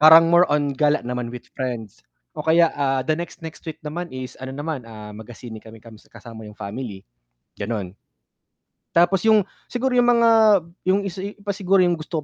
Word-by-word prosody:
Parang 165 +2 +8
more 175 +1 +6
on 145 -1 +1
gala 150 +1 +1
naman 125 -1 -3
with 120 0 -8
friends, 120 -6 -5 0.3
o - - -6
kaya, 165 +2 +4
ah, 135 -2 0
the 155 - +1
next 170 +1 -6
next 160 -1 -8
week 155 - -5
naman 170 +4 -4
is 130 -2 -7
ano 130 - -6
naman, 145 +2 -4
ah, 105 -1 -9
magsine 110 +1 -10
kami 110 +1 -13
kasama 110 0 -12
yung 105 - -13
family, 100 -1 -6 0.5
ganon. 100 -3 -4 1.0
Tapos 175 +3 +4
yung, 215 -2 +6 0.2
siguro 255 +2 -1
yung 245 - +4
mga 235 0 +5 0.6
yung 200 +2 +3
isa 190 0 -4 0.2
pa 205 - -1
siguro 195 -1 +3
yung 175 -2 +1
gusto 155 -1 -4
145 Hz, 175 wpm, -22 LUFS, 115-175 Hz, 1.0 s, Parang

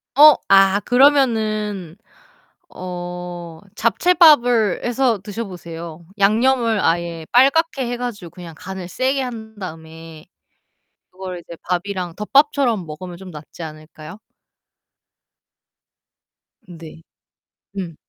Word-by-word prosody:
어. 300 +1 +9 0.2
아 195 0 +5
그러면은 220 - +2 0.7
어 175 -2 -7
잡채밥을 245 - +4
해서 245 -3 +1
드셔 215 +2 -5
보세요. 170 -2 -9
양념을 230 +2 +2
아예 165 -1 -1
빨갛게 275 +1 +3
해 245 - -3
가지고 210 -9 -6
그냥 170 -3 -11
간을 190 -2 -7
세게 265 +4 -1
한 220 -4 -7
다음에 160 -2 -10 0.9
그거를 185 -1 -7
이제 170 - -11
밥이랑 180 -1 -3
덮밥처럼 250 - +2
먹으면 170 +3 -9
좀 190 -1 -11
낫지 155 +2 -10
않을까요? 155 +4 -11 2.5
네. 165 -2 -12 0.8
음. 175 -5 -5
190 Hz, 210 characters per minute, -20 LUFS, 170-240 Hz, 2.5 s, 어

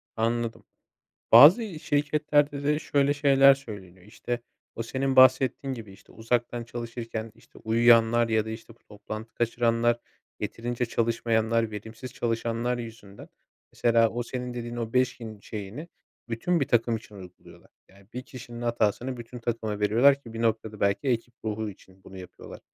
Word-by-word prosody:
Anladım. 115 0 -1 0.7
Bazı 165 - +7
şirketlerde 145 -1 +1
de 150 +1 +1
şöyle 140 -2 +1
şeyler 140 -1 +6
söyleniyor. 100 -9 -11
İşte, 120 +3 -5 0.4
o 115 - -3
senin 130 +3 -2
bahsettiğin 130 +1 +4
gibi, 110 -5 -9
işte, 95 - -19
uzaktan 120 +1 -2
çalışırken, 115 -1 -6
işte, - - -19
uyuyanlar 115 +1 +4
ya 110 -1 +1
da, - - -6
işte, 115 +1 -9
bu - - -35
toplantı 110 +2 -9
kaçıranlar, 120 0 +1 0.4
yeterince 120 +1 -3
çalışmayanlar, 115 -1 0
verimsiz 110 +4 -8
çalışanlar 115 +1 -2
yüzünden, 110 -4 -10 0.5
mesela, 115 -1 +3
o 120 +2 -3
senin 125 0 -5
dediğin 120 0 -6
o 115 -1 -5
5 125 0 +2
gün 110 -3 -9
şeyini 105 +9 -8 0.4
bütün 165 +10 0
bir 140 - 0
takım 115 -1 +2
için 110 -1 -15
uyguluyorlar. 90 -2 -14 0.2
Yani, 100 0 -21
bir 125 +1 -5
kişinin 120 -3 -10
hatasını 120 +2 -1
bütün 120 +1 -9
takıma 110 -3 -3
veriyorlar 120 +7 +4
ki, 115 -4 -12
bir 115 - -5
noktada, 110 -2 -1
belki 100 +7 0
ekip 120 -1 -1
ruhu 110 0 -3
için 95 -1 -17
bunu 95 0 -12
yapıyorlar. 90 -1 -11
115 Hz, 150 wpm, -26 LUFS, 110-125 Hz, 0.7 s, Bazı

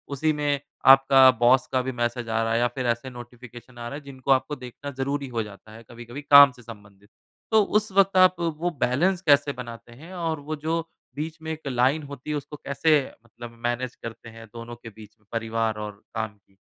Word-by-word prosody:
उसी 155 +3 +1
में 145 -1 -1 0.3
आपका 135 0 +8
बॉस 125 +2 +4
का 130 - +1
भी 130 - -3
मैसेज 120 -1 -3
आ 115 0 0
रहा 115 0 -1
है 115 - +2
या 120 - +3
फिर 130 -2 -3
ऐसे 120 +3 -1
नोटिफ़िकेशन 120 0 -12
आ 120 0 -6
रहे 145 - -6
है - - -20
जिनको 135 0 -4
आपको 135 +3 +2
देखना 130 +2 -9
ज़रूरी 140 +1 -2
हो 115 -3 -2
जाता 105 +1 -13
है 115 +1 -13
कभी-कभी 120 +4 -9
काम 140 -1 +8
से 125 -1 -17
संबंधित। 100 -3 -14 0.4
तो 220 -1 +5 0.2
उस 215 -1 -10
वक़्त 195 0 +3
आप 185 0 +6
वो 165 +1 -1
बैलेंस 170 +9 +1
कैसे 145 -3 +3
बनाते 120 -1 -9
हैं? 160 +10 -13
और 165 -4 -3
वो 155 +2 -5
जो 160 +3 -2 0.4
बीच 160 +2 -5
में 160 0 -5
एक 155 -2 -7
लाइन 130 +4 +1
होती 140 0 -10
है 150 - -1
उसको 150 +1 -8
कैसे 150 +2 +2 0.3
मतलब 120 +1 -11
मैनेज 120 +1 -2
करते 115 0 -10
हैं 115 0 -12
दोनों 115 0 -8
के 120 -1 -12
बीच 110 0 -15
में, 110 - -34
परिवार 115 -1 -1
और 105 -1 -7
काम 110 -2 -4
की? 95 -1 -34
130 Hz, 215 wpm, -25 LUFS, 115-145 Hz, 0.4 s, आपका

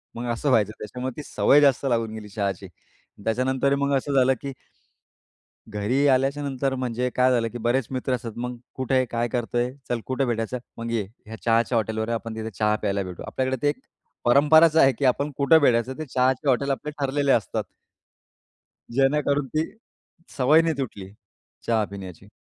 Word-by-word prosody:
मग 120 +1 -5
असं 130 +5 -1
व्हायचं, 110 -5 +3
त्याच्यामुळे 125 +5 -5
ती 150 - -5
सवय 145 - +4
जास्त 140 -1 +3
लागून 115 -2 0
गेली 110 -1 -8
चहाची. 100 -1 -3 0.6
त्याच्यानंतर 130 +4 +1
मग 140 0 +1
असं 140 +2 -3
झालं, 130 -1 +4
की 140 -1 -5 1.2
घरी 115 +7 +1
आल्याच्यानंतर 135 0 +1
म्हणजे 125 -1 -1
काय 130 0 +4
झालं, 115 -2 +1
की 120 - -6
बरेच 120 +2 0
मित्र 130 0 -1
असतात, 120 -2 -5
मग 125 +1 -4 0.2
"कुठे 130 0 -2
आहे, 130 - +3
काय 120 0 -1
करतोय? 120 +1 -1 0.2
चल 120 -1 0
कुठे 130 +1 0
भेटायचं? 115 +1 -2 0.2
मग 115 0 -4
ये, 115 -2 +1 0.3
या 110 - -7
चहाच्या 115 +1 +2
हॉटेलवर 110 0 -2
ये, 115 - 0
आपण 115 0 -5
तिथे 110 0 -4
चहा 105 +1 +1
प्यायला 100 -1 0
भेटू." 90 -2 -8
आपल्याकडे 130 0 -1
ते 145 - +3
एक 150 - -8 0.5
परंपराच 150 +5 +6
आहे, 135 -4 +6
की 140 - -4
आपण 140 +3 +1
कुठे 140 +3 +6
भेटायचं 125 -1 +2
ते 155 - -5
चहाचे 130 +2 +1
हॉटेल 135 +2 +2
आपले 135 +3 -4
ठरलेले 140 0 +1
असतात. 110 - 0 1.3
जेणेकरून 140 +1 +2
ती, 155 +3 0 0.7
सवय 150 +5 +5
नाही 165 -3 -1
तुटली, 105 -8 -5 0.5
चहा 115 -2 +1
पिण्याची. 95 -1 -9
125 Hz, 175 wpm, -24 LUFS, 115-140 Hz, 1.3 s, परंपराच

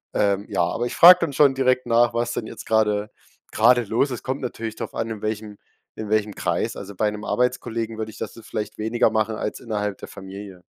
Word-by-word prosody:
Ähm, 100 0 +1
ja, 85 - +1
aber 115 +8 -1
ich - - -6
frage 180 +1 +9
dann 160 -4 -1
schon 140 0 +5
direkt 130 -1 +1
nach, 120 0 +3
was 120 0 -1
denn 110 - -4
jetzt - - -9
gerade 105 -1 +1 0.4
gerade 120 +2 +4
los 115 +6 0
ist. 125 - -6
Kommt 135 +1 -3
natürlich 115 -3 -5
drauf 115 -1 -7
an, 115 0 -2
in 110 -2 -6
welchem 105 -1 -4 0.4
in 110 -1 -6
welchem 105 -1 +1
Kreis. - - -2
Also, 100 0 -8
bei 105 +2 +1
'nem 105 0 -8
Arbeitskollegen 115 -3 -1
würde 110 - -3
ich 110 - -12
das - - -7
vielleicht 105 0 -5
weniger 110 +1 +1
machen 110 0 0
als 105 - -4
innerhalb 105 -4 -3
der - - -8
Familie. 95 -1 -10
110 Hz, 215 wpm, -23 LUFS, 105-120 Hz, 0.4 s, frage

